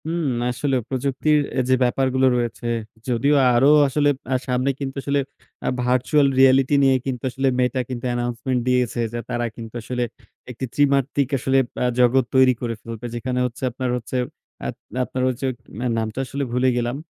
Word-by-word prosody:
হুম। 165 +1 -2 0.3
আসলে 130 +2 -1
প্রযুক্তির 140 +3 +1 0.2
এ - - +3
যে 130 - +5
ব্যাপারগুলো 130 +1 +2
রয়েছে, 120 -1 -3 0.4
যদিও 125 +5 +2 0.2
আরো 125 +4 +5 0.2
আসলে 145 +2 +2 0.2
আ - - +3
সামনে 125 +1 +1
কিন্তু 135 -2 -4
আসলে 140 0 +1 0.5
আ - - +2
virtual 130 +4 +3
reality 135 +1 +5
নিয়ে 135 -1 +5
কিন্তু 130 -3 -3
আসলে 135 +2 -1
Meta 125 +1 +1
কিন্তু 125 -1 -5
announcement 120 +1 -1
দিয়েছে, 125 -1 +1
যে 120 - -2
তারা 120 0 -1
কিন্তু 115 0 -9
আসলে 125 +2 -2 0.5
একটি 125 +2 -5
ত্রিমাত্রক 140 -1 +2
আসলে 135 +1 +1 0.3
আ - - +2
জগৎ 125 +1 +4
তৈরি 130 -1 +6
করে 115 -2 -2
ফেলবে। 115 0 -8
যেখানে 125 +2 -2
হচ্ছে 125 +2 -6
আপনার 130 +1 -3
হচ্ছে 125 +2 -4 0.5
আত - - -4 0.3
আপনার 130 0 -3
হচ্ছে 130 +1 -3 0.4
আ - - +2
নামটা 110 +2 -3
আসলে 140 +2 -3
ভুলে 125 +2 +2
গেলাম। 120 +1 -1
130 Hz, 170 wpm, -22 LUFS, 120-135 Hz, 0.5 s, তৈরি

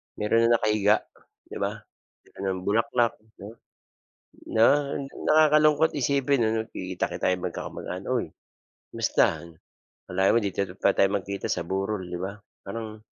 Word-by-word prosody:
mayro'n 115 +2 +2
ng 120 - +4
nakahiga, 105 -1 +2 0.5
'di - - -6
ba? - - -1 0.5
Dala - - -20 0.2
ng 90 - -7
bulaklak, 115 +3 +1 0.3
'no? 115 +3 -11 0.9
na 110 0 +5 0.6
Nakakalungkot 155 0 +4
isipin 140 -2 +1
ano, 110 0 -1
nagkikita-kita 95 -1 -4
tayo 90 - +3
magkakamag-anak, 90 +2 -6
"huy, 125 - 0 0.6
kamusta? - - +1 0.6
Akalain 95 +3 +2
mo - - +5
dito 100 -1 -2 0.2
pa 100 - +5
tayo 100 +1 +3
magkikita 100 0 -3
sa 85 - 0
burol, 95 +1 -2
'di 90 - -4
ba?" 95 +2 -4 0.3
Parang 110 +1 -6
110 Hz, 135 wpm, -26 LUFS, 95-115 Hz, 0.9 s, na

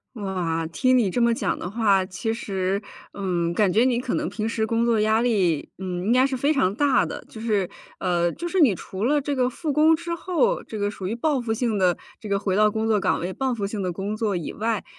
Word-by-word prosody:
哇， 180 -6 -2
听 255 +6 +3
你 215 -6 +2
这 245 - -1
么 235 0 +4
讲 - - -1
的 180 - -5
话， 200 -3 +2
其 195 +5 -3
实， 195 -3 -2 0.3
嗯， 175 -4 -1
感 195 0 +2
觉 225 +5 +4
你 245 -2 +2
可 250 -1 -3
能 - - -1
平 220 0 -3
时 220 -1 -1
工 230 +1 +1
作 230 -2 +2
压 220 +1 +3
力， 190 -10 +1
嗯， 180 -1 -4
应 230 - +3
该 255 +1 +5
是 270 -1 0
非 285 +5 +2
常 185 -8 +2
大 285 -2 +3
的。 - - -5
就 220 - -10
是， 210 -5 0 0.3
呃， 175 -2 +1
就 345 - -6
是 370 +1 0
你 230 - +5
除 190 +6 -5
了 295 +1 +3
这 285 +1 -2
个 255 -1 +1
复 300 +4 -3
工 310 +2 +5
之 340 +1 -4
后， 375 +9 0
这 215 - -7
个 205 0 0
属 190 -2 -5
于 225 - -2
报 285 0 +1
复 230 -2 -2
性 225 -1 0
地 180 -2 +2 0.2
这 215 - -8
个 200 0 +1
回 195 -2 -1
到 210 +1 +4
工 220 +1 -2
作 215 -2 +2
岗 - - +1
位， 180 +2 -3
报 265 +2 -1
复 205 -4 -2
性 205 -1 -4
地 180 - -1
工 200 +4 -3
作 210 -4 0
以 165 - -4
外， 220 -1 -2
220 Hz, 270 characters per minute, -24 LUFS, 190-250 Hz, 0.3 s, 该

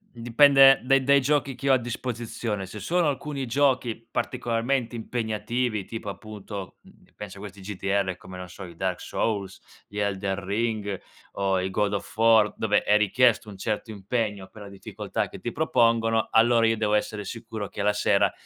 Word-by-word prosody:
dipende 135 +3 +5
dai 135 +1 +3
dai 140 +1 +5
giochi 140 -1 +1
che 140 +3 -3
ho 135 - +6
a - - +5
disposizione. 115 -3 -4
Se 100 +3 -9
sono 175 -1 +1
alcuni 145 -1 -2
giochi 125 -3 0
particolarmente 120 0 -1
impegnativi, 110 -1 -2
tipo 115 -2 -7
appunto, 100 -2 -8
mhmm, - - -20
penso 100 -2 -9
a - - -11
questi 100 -1 -9
GDR, 95 -1 -1
come, 90 0 -11
non 90 -1 -7
so, 95 +2 -10
i 85 -1 -10
Dark 95 -1 -2
Souls, 100 -4 -2 0.3
gli 105 - -9
Elden 100 -1 -1
Ring 105 -1 -2 0.3
o 95 -1 0
i 95 - -1
God 100 +2 0
of 100 - -5
War, 110 -2 +5
dove 105 -2 +1
è 105 - +3
richiesto 110 +1 +3
un 100 - -11
certo 110 +2 -3
impegno 105 -1 -3
per 105 - -13
la 100 - -9
difficoltà 100 - -4
che - - -10
ti - - -5
propongono, 115 -1 +2
allora 115 0 +4
io 115 -1 +1
devo 105 -1 +1
essere 105 -1 -1
sicuro 110 -3 -6
che 100 - -5
la 105 0 +3
sera 105 -1 +2
110 Hz, 180 wpm, -26 LUFS, 100-120 Hz, 0.3 s, ho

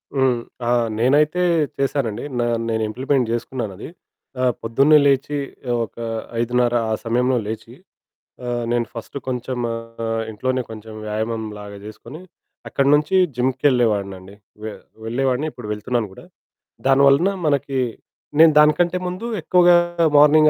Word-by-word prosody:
హ్మ్. 130 -3 +2 0.3
ఆ! - - +1 0.3
నేనైతే 150 +8 +3 0.4
చేశానండి. 130 -5 -1 0.2
నా 120 - +1 0.2
నేనింప్లిమెంట్ 115 +3 0
జేసుకున్నానది. 115 -2 -4 0.5
ఆహ్, 125 -2 +3
పొద్దున్నే 135 +7 +4
లేచీ 140 +1 +2 0.3
ఆహ్, 120 - +1
ఒకా 115 +1 -8 0.3
5:30 120 +1 +1 0.2
ఆ - - +2
సమయంలో 125 +2 +1
లేచి, 110 0 -6 0.7
ఆహ్, 120 -1 -2
నేను 120 -1 +1
ఫస్ట్ 115 +4 -7
కొంచెం 125 0 -3 0.2
ఆహ్, 115 0 -4
ఇంట్లోనే 130 +4 -1
కొంచెం 110 0 -9
వ్యాయామంలాగా 105 -1 -4
జేసుకొని, 110 +9 -10 0.5
అక్కడి 140 0 +1
నుంచీ 150 +5 +2 0.2
జిమ్‌కెళ్ళే 130 -1 +2
వాడినండి. 100 -1 -6 0.3
వె 110 - -4 0.3
వెళ్ళేవాడిని, 130 +5 0
ఇప్పుడు 120 -6 -9
వెళ్తున్నాను 110 0 -2
గూడా. - - -13 0.6
దాని 135 0 +5
వలనా 165 +9 +4
మనకీ 140 -2 0 0.6
నేను 165 0 +8
దానికంటే 160 +4 +4
ముందు 180 +5 -5 0.2
ఎక్కువగా 175 +2 +5 0.4
మార్నింగ్ 155 +1 +7
125 Hz, 125 wpm, -21 LUFS, 115-140 Hz, 0.7 s, నేను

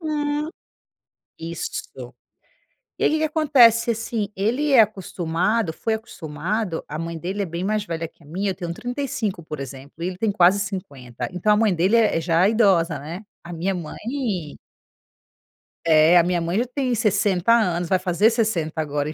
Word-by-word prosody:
Uhum. 300 -1 -2 0.9
Isso. 165 +1 -6 0.9
E - - -1
aí - - +5
que 315 - +2
que - - 0
acontece, 255 -7 +4
assim, 225 -2 -2
ele 245 +10 0
é 235 - +9
acostumado 190 -1 -1
foi 220 +7 -2
acostumado, 185 -2 -4
a 150 - -4
mãe 165 0 -4
dele 190 +5 -3
é - - -2
bem 170 +2 -5
mais 210 +1 -1
velha 165 -2 -4
que 165 - -29
a - - -18
minha, 195 +5 -2
eu - - -6
tenho 170 -1 -5
35, 245 -6 -3
por 155 -2 -7
exemplo, 135 +1 -9
e - - 0
ele 185 -1 -5
tem 215 0 0
quase 190 +1 +4
50, 145 - -5
então 195 +4 +2
a - - +4
mãe 215 -4 +3
dele 185 +7 +2
é 220 -7 +3
é - - -1
já 170 +2 +3
idosa, 180 - +3
né. 165 +7 -7 0.2
A 175 - -8
minha 180 +4 -1
mãe 190 - -4 1.3
é, 160 +2 +6
a 170 - +6
minha 175 0 0
mãe 170 +5 -1
já 245 - +1
tem 255 0 -1
60 205 -3 +2
anos, 180 -7 +1
vai 185 - +4
fazer 185 +4 +2
60 180 -9 -1
agora 145 0 -2
em - - -6
190 Hz, 180 wpm, -23 LUFS, 165-225 Hz, 1.3 s, é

